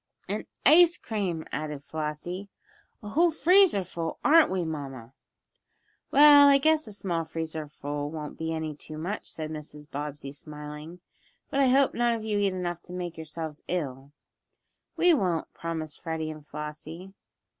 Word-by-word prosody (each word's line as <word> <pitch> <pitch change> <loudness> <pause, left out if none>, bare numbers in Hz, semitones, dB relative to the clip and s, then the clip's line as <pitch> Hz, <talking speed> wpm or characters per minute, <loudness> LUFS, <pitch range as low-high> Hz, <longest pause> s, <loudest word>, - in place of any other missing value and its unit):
"And - - -3 0.2
ice 345 +1 +7
cream" 185 -7 -3
added 150 -1 -4
Flossie 160 +6 -5 0.5
"a 210 - -6
whole 335 +9 +4
freezer 345 - +4
full; 165 -2 -5
aren't 325 +1 +7
we, 185 -2 -1
mamma?" 135 -6 -6 1.0
"Well, 290 0 +8
I 280 -1 +7
guess 310 +2 +2
a - - -7
small 180 -5 -2
freezer 160 -1 -5
full 145 0 -4
won't 150 -1 -6
be 160 0 -3
any 160 -1 -3
too 155 +1 -9
much," 180 +7 -4
said 155 -1 -5
Mrs. 150 -1 -8
Bobbsey, 145 -1 -6
smiling. 150 +3 -9 0.5
"But 275 - 0
I 275 - +5
hope 270 +2 +4
none 240 0 +2
of 225 - -6
you 210 -2 0
eat 200 - +3
enough 180 -2 -3
to 180 - -10
make 175 -2 -4
yourselves 160 -1 -7
ill." 140 -6 -3 0.9
"We 355 0 +5
won't," 180 - 0
promised 160 -2 -5
Freddie 160 -2 -3
and 155 -1 -10
Flossie. 155 +5 -8
165 Hz, 155 wpm, -27 LUFS, 150-205 Hz, 1.0 s, Well